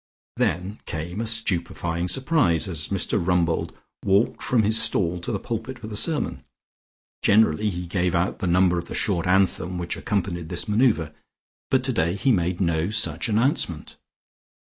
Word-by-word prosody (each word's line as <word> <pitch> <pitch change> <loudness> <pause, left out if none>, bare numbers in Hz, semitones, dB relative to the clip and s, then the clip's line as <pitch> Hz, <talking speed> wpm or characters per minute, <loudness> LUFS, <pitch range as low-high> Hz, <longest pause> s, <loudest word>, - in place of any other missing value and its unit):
Then 95 +5 -1
came 85 +6 -4
a 115 - -2
stupefying 90 -5 -1
surprise 130 - +1
as 80 -4 -4
Mr 100 -1 -1
Rumbold 85 -2 +1 0.3
walked 100 +4 +2
from 120 -4 +2
his 110 +2 +3
stall 90 -2 +1
to 85 - -4
the 105 - -1
pulpit 115 +5 -5
for 120 - -10
the 110 -1 -6
sermon. 155 +7 0 0.8
Generally 105 -1 +3
he 90 -2 -4
gave 90 0 0
out 85 +2 0
the 95 - -2
number 90 0 +3
of 85 - -7
the - - -6
short 90 -5 0
anthem 90 -1 +1
which 85 -1 -2
accompanied 90 -6 -2
this - - -2
manoeuvre, 105 - +2 0.6
but 130 -1 +2
today 95 -10 +1
he 100 +7 +1
made 90 -4 0
no 85 -1 0
such 110 +2 +1
announcement. 110 - 0
95 Hz, 160 wpm, -24 LUFS, 85-110 Hz, 0.8 s, his